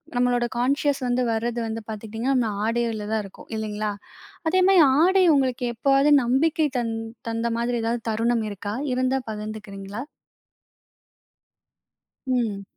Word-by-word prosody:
நம்பளோட 245 0 +2
கான்ஷியஸ் 280 +3 +1
வந்து 245 +1 +1
வரது 235 +2 -1
வந்து 225 0 -4
பாத்துக்கிட்டீங்கன்னா, 225 +5 -2
நம்ப - - -1 0.2
ஆடைகள்ல 230 -2 -1
தான் 220 -1 +1
இருக்கும் 195 - -14
இல்லங்களா? 215 -1 -2 0.6
அதே 370 +3 +3
மாதிரி 385 -3 +6 0.2
ஆடை 375 +2 +5
உங்களுக்கு 255 -2 0
எப்போதாவது 275 +4 +3
நம்பிக்கை 300 +6 +2
த - - +1 0.5
தந்த 230 +1 -1
மாதிரி 240 0 0
ஏதாவது 230 +1 -1
தருணம் 230 +1 +1
இருக்கா? 205 0 -5 0.2
இருந்தா 255 +1 +1
பகிர்ந்துக்கிறீங்களா? 210 0 -6 2.2
ம். 230 -6 -1
235 Hz, 120 wpm, -24 LUFS, 220-260 Hz, 2.2 s, மாதிரி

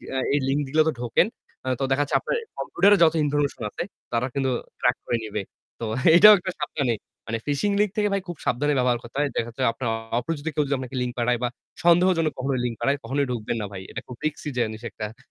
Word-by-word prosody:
আ - - +1 0.2
এই 145 - +3
link 140 +2 +1
গুলোতে 155 0 +4
ঢোকেন 120 - +3 0.5
তো - - -1
দেখা 135 +2 +3
যাচ্ছে 145 - -2
আপনার - - -2 0.2
কম্পিউটারে 205 +1 +4
যত 160 - +5
information 145 -2 0
আছে 105 - -4 0.3
তারা 115 +1 +1
কিন্তু 135 -2 0 0.3
track - - +2
করে 120 - 0
নিবে। 105 -1 -3 0.4
তো 115 - -3 0.3
এটাও 210 +4 +10
একটা 185 +1 -4
সাবধানী। 140 -4 0 0.3
মানে 115 +1 -1
phishing 150 +8 +1
link 210 -2 +2
থেকে 210 -1 +3
ভাই 195 - +1
খুব 175 -3 -6
সাবধানে 145 +4 +1
ব্যবহার 125 -1 +2
করতে 120 +4 -10
হয়। 145 -1 +2
দেখা 115 - 0
যাচ্ছে 120 +3 -4
আপনার 120 +1 -4 0.3
অপরিচিত 145 +4 -4
কেউ 150 - +2
যদি 140 - +1
আপনাকে 130 0 -6
link 125 -1 -2
পাঠায় 120 0 +1
বা - - +3 0.4
সন্দেহজনক 170 -2 +4
কখনো 135 +1 -1
link 120 -2 -1
পাঠায় 140 +4 +1
কখনোই 135 +4 0
ঢুকবেন 115 -1 -2
না 105 - -2
ভাই। 95 -1 -7
এটা 115 - -5
খুব 125 - -8
risky 155 0 -2
জিনিস 110 -2 -1
একটা। 110 +1 -7
135 Hz, 215 wpm, -25 LUFS, 120-155 Hz, 0.5 s, এটাও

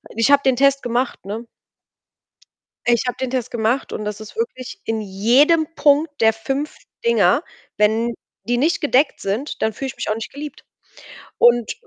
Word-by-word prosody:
Ich 230 +5 +2
habe 280 - +6
den 265 - +4
Test 275 +1 +3
gemacht, 245 +1 -2
ne? 220 +4 -5 1.4
Ich 240 -1 +3
habe 250 - -2
den 260 -1 -2
Test 250 -2 -3
gemacht 235 +3 0
und 210 - -4
das 210 0 -4
ist 215 - -11
wirklich 400 - -4
in 225 -1 -1
jedem 250 - +3
Punkt 290 +2 +3
der 225 0 +5
5 270 +7 -4 0.3
Dinger 470 - +3 0.3
wenn 220 +3 +2 0.3
die 240 +1 0
nicht 310 +7 +1
gedeckt 285 0 +2
sind, 220 +10 -3
dann 220 -1 +1
fühle 270 +5 -5
ich - - -8
mich - - -4
auch 215 - +1
nicht 225 - -6
geliebt 295 +1 -9 0.7
und 240 -1 +4
245 Hz, 170 wpm, -20 LUFS, 225-280 Hz, 1.4 s, habe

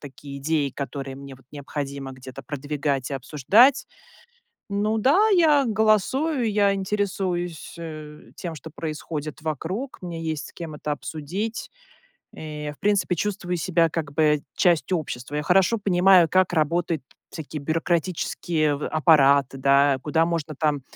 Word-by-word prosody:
такие 140 0 -10
идеи, 145 -1 0
которые 135 -1 -6
мне 140 -1 -10
вот 135 - -20
необходимо 140 -1 -6
где-то 130 0 -10
продвигать 145 -2 -3
и - - -2
обсуждать. 175 - +4 0.8
Ну 210 +2 0
да, 295 - +4
я 315 -8 +4
голосую, 225 +5 +1
я 200 -1 +3
интересуюсь, 190 -4 -2
э, 155 -2 -9
тем, 170 -3 -6
что 155 +2 -10
происходит 155 -1 -5
вокруг, 165 - -4
мне 170 -2 -6
есть 155 -2 -3
с - - -20
кем 165 -3 -7
это 150 0 -4
обсудить. 175 +10 -5 0.7
Э, 150 -1 -6
и - - -4
в - - -18
принципе, 200 -3 +1
чувствую 180 -1 -2
себя 170 -1 +2
как-бы 150 -1 +1
частью 175 +1 +2
общества. 140 -2 -6
Я 150 - -1
хорошо 190 +7 +3
понимаю, 185 -3 +5
как 185 -1 +3
работают 165 0 0 0.3
всякие 155 -2 -7
бюрократические 165 -1 0
в 145 - -4
аппараты, 140 -4 +4
да, 140 0 +4
куда 160 +2 +2
можно 165 -2 -3
там 150 -3 0
160 Hz, 140 wpm, -24 LUFS, 145-185 Hz, 0.8 s, понимаю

